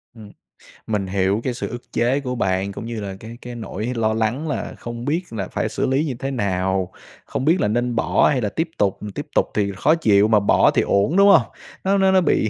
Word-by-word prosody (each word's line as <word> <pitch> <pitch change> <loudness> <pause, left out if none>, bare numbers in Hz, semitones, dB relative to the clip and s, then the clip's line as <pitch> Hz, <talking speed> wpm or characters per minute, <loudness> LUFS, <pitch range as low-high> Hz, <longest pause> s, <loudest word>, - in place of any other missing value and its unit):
Ừm, 105 -3 -12 0.6
mình 105 -3 -1
hiểu 95 +2 0
cái 130 - -1
sự 120 - -4
ức 120 0 -9
chế 120 +4 +2
của 125 -3 -4
bạn 95 -3 0
cũng 100 - -7
như 115 -2 -5
là 100 -1 -5
cái 115 +2 -10
cái 120 0 -8
nỗi 110 0 -4
lo 110 -1 +1
lắng 115 +8 -1
là 150 - -3
không 120 0 -7
biết 160 +6 0
là 100 -5 -4
phải - - -2
xử - - -1
lý 135 +4 +1
như 140 - -2
thế 135 +1 -3
nào, 95 -4 -1 0.3
không 130 - -3
biết 165 +4 +3
là - - +2
nên 120 +3 0
bỏ - - +3
hay 130 -4 +1
là 105 - 0
tiếp 160 +9 -2
tục, 100 -1 +1 0.2
tiếp - - -4
tục - - +4
thì 100 -1 0
khó 155 - +3
chịu 105 -10 +4
mà 110 -1 +4
bỏ 100 - +4
thì - - +2
uổng, 100 - +1
đúng 200 0 +7
hông? 165 - +7 0.4
Nó 195 +1 +2
nó 190 -1 +4
nó 190 0 +5
bị 110 -9 +2
115 Hz, 245 wpm, -21 LUFS, 100-135 Hz, 0.6 s, đúng